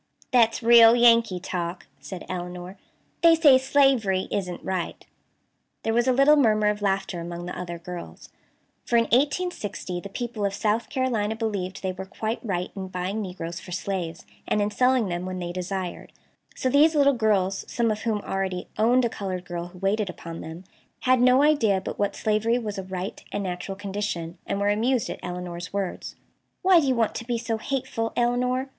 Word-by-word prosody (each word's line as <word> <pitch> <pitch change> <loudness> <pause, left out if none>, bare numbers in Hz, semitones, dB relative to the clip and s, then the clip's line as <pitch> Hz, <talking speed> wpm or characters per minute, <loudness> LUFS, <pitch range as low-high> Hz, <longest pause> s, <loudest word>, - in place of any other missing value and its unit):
"That's 235 -1 +3
real 230 0 +8
Yankee 230 -5 +5
talk," 175 -1 -4
said 185 -2 -8
Elinor. 180 +1 -6 0.5
"They 335 -1 +7
say 290 -5 +6
slavery 260 -8 +2
isn't 180 -3 -3
right." 185 -2 -3 0.8
There 225 - 0
was 240 +2 +2
a - - +5
little 275 +4 +6
murmur 215 -7 +3
of 210 0 -2
laughter 195 -2 -1
among 170 +1 -6
the 180 - -5
other 175 -1 -5
girls. 175 +1 -9 0.5
For 235 - +2
in 230 - +5
1860 245 - -1
the 200 - -8
people 235 0 -4
of 200 -1 0
South 215 +2 0
Carolina 235 -6 0
believed 200 -5 -3
they 190 - 0
were 190 +1 -7
quite 220 +3 -3
right 180 -5 -2
in 190 -1 -5
buying 185 +3 -3
negroes 175 -3 -5
for 180 - -11
slaves, 180 -3 -4 0.2
and - - +1
in 205 0 0
selling 250 0 +2
them 175 0 -3
when 185 0 -4
they 175 -1 -4
desired; 185 0 -5 0.4
so - - -1
these 295 +5 +5
little 280 -1 +5
girls, 200 -5 +1
some 235 -2 +1
of 210 - -2
whom 220 -3 -1
already 190 -2 -3
"owned" 245 +3 +4
a - - +3
colored 185 -4 -5
girl 175 0 -5
who 180 +1 -15
waited 195 +2 0
upon 165 -2 -8
them, 160 +3 -8 0.4
had 255 -1 +3
no 255 +2 +5
idea 230 -11 +3
but 190 - -6
what 205 -1 0
slavery 220 +2 +1
was 210 -4 -4
a - - -4
right 185 +1 -6
and 205 - -2
natural 185 +1 -4
condition, 195 -4 -4
and 200 - -1
were 200 0 +2
amused 230 +4 +1
at - - -7
Elinor's 180 0 -6
words. 200 -2 -4 0.5
"Why 370 -2 +6
do 290 - 0
you 260 - +2
want 225 -2 +1
to 235 - -6
be 240 -1 0
so 225 -1 -3
hateful, 230 -2 -3
Elinor?" 250 +2 +1
205 Hz, 190 wpm, -25 LUFS, 185-240 Hz, 0.8 s, real